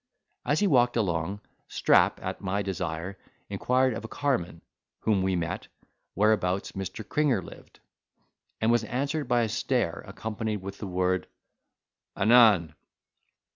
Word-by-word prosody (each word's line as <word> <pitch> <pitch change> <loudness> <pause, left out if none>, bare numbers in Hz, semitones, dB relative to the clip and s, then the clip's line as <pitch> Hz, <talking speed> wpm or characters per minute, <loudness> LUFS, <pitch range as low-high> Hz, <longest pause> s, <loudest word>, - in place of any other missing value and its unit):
As 150 +5 +2
he - - +4
walked 125 -8 +3
along, 95 -1 -1 0.3
Strap, - - +3
at - - -4
my 100 +2 -1
desire, 90 -1 -4 0.3
inquired 130 0 +2
of - - -6
a - - -5
carman, 120 -13 -2 0.4
whom 105 -3 +2
we 95 0 +1
met, 85 -2 -3 0.5
whereabouts 100 -3 +1
Mr. 95 +3 -6
Cringer 140 - +1
lived: - - -14 0.8
and 110 +1 +2
was 120 -1 +3
answered 140 +5 -2
by 120 -1 +3
a 115 - +1
stare, 120 -4 -1
accompanied 110 -1 -4
with 100 0 -8
the 105 - -5
word 90 0 0 0.9
"Anan!" 110 -9 +5
105 Hz, 135 wpm, -27 LUFS, 95-120 Hz, 0.9 s, Anan